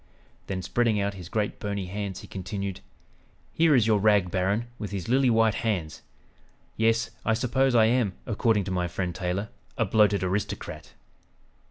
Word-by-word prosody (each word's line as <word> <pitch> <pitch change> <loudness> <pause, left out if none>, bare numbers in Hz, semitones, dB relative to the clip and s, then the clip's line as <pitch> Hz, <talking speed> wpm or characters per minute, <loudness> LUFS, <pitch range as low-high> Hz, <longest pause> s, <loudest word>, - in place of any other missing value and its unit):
'" - - -34
Then 95 -1 -3
spreading 115 +2 +1
out 100 0 -1
his 90 -3 -9
great 105 -1 -2
bony 100 -2 -3
hands 100 0 -5
he - - -11
continued, 95 0 -5 0.7
"Here 160 -2 +4
is 120 -4 +4
your 110 -2 +3
'rag 100 -3 +3
baron' 100 +6 0
with 105 - -4
his 100 -3 -5
lily 130 +2 +3
white 115 -2 +4
hands. 90 -10 -2 0.7
Yes, 115 +1 +1
I 115 - +2
suppose 130 +2 +1
I 110 -2 +6
am, 115 -4 +2
according 110 -1 +1
to 95 - -5
my 90 -1 0
friend 90 0 -3
Taylor, 95 +4 -3 0.3
a 115 - +2
'bloated 105 -1 +3
aristocrat!'" 95 +3 -3
105 Hz, 170 wpm, -26 LUFS, 95-115 Hz, 0.7 s, I